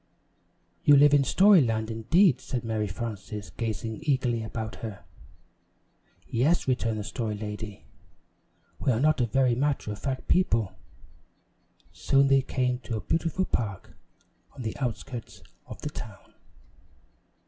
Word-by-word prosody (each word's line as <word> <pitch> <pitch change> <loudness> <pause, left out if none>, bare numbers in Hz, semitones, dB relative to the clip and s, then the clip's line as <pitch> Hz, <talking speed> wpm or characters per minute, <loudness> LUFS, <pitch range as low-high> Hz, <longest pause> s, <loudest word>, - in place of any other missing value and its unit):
"You 145 -1 +7
live 145 +1 +6
in 145 -1 +5
Story 195 +4 +6
Land, 110 -2 -1
indeed," 130 - +3
said 125 -3 -4
Mary 110 -2 -1
Frances, 105 0 -6
gazing 110 -1 -4
eagerly 130 -6 0
about 110 0 -5
her. 110 -4 -7 1.2
"Yes," 140 +9 +1
returned 115 -4 0
the 105 - -3
Story 110 0 -3
Lady, 105 -1 -7 0.9
"we 135 - +1
are 115 - +1
not 155 0 +3
a 120 - +2
very 130 +1 +2
matter 135 -3 -1
of 105 - -6
fact 130 +3 -4
people." 115 - +2 1.2
Soon 135 +11 +2
they 135 0 +5
came 125 -1 -1
to 120 -2 -4
a - - -4
beautiful 165 - 0
park 105 - -3 0.6
on 130 - -8
the 110 - -3
outskirts 125 -1 -5 0.2
of - - -9
the - - -3
town. - - -10
120 Hz, 135 wpm, -27 LUFS, 110-140 Hz, 1.2 s, You